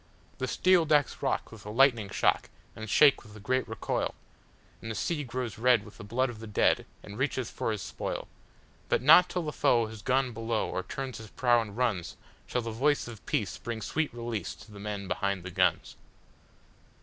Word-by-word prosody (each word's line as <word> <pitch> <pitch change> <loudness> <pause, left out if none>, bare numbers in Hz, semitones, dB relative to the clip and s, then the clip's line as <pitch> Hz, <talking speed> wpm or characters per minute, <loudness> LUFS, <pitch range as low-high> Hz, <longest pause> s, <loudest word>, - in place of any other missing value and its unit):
The 130 - -1
steel 180 +3 +4
decks 150 -2 +2
rock 135 - -1
with 115 -2 -11
the 105 - -9
lighting 120 -4 +4
shock, - - +1 0.3
and 110 -1 -7
shake 145 +6 +6
with 105 -2 -15
the - - -10
great 130 +5 0
recoil, 110 - -2 0.7
And 115 - -6
the 110 - -3
sea 155 +3 -1
grows 125 -3 -4
red 120 -3 +4
with 105 - -14
the - - -7
blood 120 +5 0
of 110 - -11
the 110 - -8
dead 105 - +2 0.2
and 105 +3 -9
reaches 130 -3 -1
for - - -2
his 105 -3 -3
spoil—But - - -5
not 165 +6 +8
till 180 - -2
the 150 - -3
foe 120 -5 +3
has 110 -1 -9
gone 130 0 +1
below 115 0 -1
or - - -2
turns 130 +5 -6
his 110 - -9
prow 120 -2 +3
and 105 -1 -8
runs, 110 -9 -1 0.3
Shall 125 - -1
the 115 - -4
voice 140 +6 +1
of 115 -3 -10
peace - - -1
bring 115 +2 -4
sweet 155 +6 -1
release 120 -3 -4
to 110 - -15
the 100 - -11
men 100 -1 -5
behind 100 -1 -1
the 90 - -7
guns! - - +1
115 Hz, 200 wpm, -29 LUFS, 110-130 Hz, 0.7 s, not